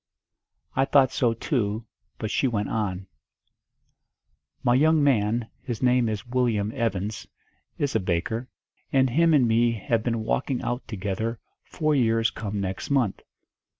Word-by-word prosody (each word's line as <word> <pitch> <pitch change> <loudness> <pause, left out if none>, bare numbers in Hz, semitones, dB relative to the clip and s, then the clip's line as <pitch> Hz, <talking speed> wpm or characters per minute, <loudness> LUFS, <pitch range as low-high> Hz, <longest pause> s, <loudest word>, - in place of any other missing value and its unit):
I 135 - +3
thought 135 -2 +4
so 115 -2 +1
too, 110 -4 -1 0.3
but 110 -1 -4
she 135 - +2
went 105 -4 -1
on: 95 -4 -2 1.6
"My 120 - +4
young 155 +3 +4
man, 115 -3 +1
his 120 -1 -5
name 125 -2 +3
is 110 +3 -4
Willyum 120 -4 0
Evans, 110 -4 -2 0.5
is 140 -2 -1
a - - +4
baker, 95 +7 -2 0.4
and 130 -2 +3
him 165 +5 +4
and 140 -6 +4
me 115 +1 +3
have 115 +1 -1
been 115 -1 -1
walking 130 +3 -1
out 120 +2 -3
together 105 +2 -3 0.2
four 155 -2 -1
years 115 -4 +2
come 105 -1 -4
next 95 -1 -4
month. 130 -8 +1
115 Hz, 145 wpm, -25 LUFS, 105-130 Hz, 1.6 s, thought